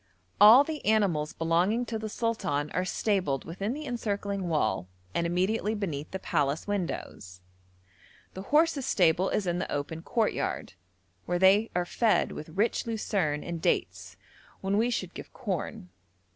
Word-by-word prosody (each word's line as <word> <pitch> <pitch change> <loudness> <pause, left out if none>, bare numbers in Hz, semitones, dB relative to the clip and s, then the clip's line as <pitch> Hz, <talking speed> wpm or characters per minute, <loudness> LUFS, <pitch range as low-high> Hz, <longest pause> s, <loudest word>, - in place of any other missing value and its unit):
All 220 +7 +9
the 305 0 -5
animals 190 -9 +2
belonging 175 +9 +1
to 225 -1 -4
the 220 0 -5
sultan 195 -11 -1
are 180 +1 -1
stabled 185 - 0
within 195 +6 -3
the 305 +2 -6
encircling 200 -6 -3
wall, 110 - 0 0.3
and 170 - 0
immediately 200 +5 0
beneath 160 -8 -4
the 190 - -4
palace 145 -4 -1
windows; 170 - -4 0.9
the 190 - -6
horses' 295 +3 +2
stable 180 +1 +3
is 205 - -1
in 175 0 -1
the - - -4
open 145 +3 -3
courtyard, 220 +5 -1 0.5
where 175 - +1
they 195 +4 +5
are 180 0 +1
fed 225 +4 +2
with 150 - -8
rich 210 +8 0
lucerne 195 -9 -1
and 170 -1 -5
dates 90 - -1 0.4
when 195 +1 0
we 235 +2 +2
should 185 -7 -3
give - - -9
corn. 185 - -4
190 Hz, 150 wpm, -28 LUFS, 165-220 Hz, 0.9 s, All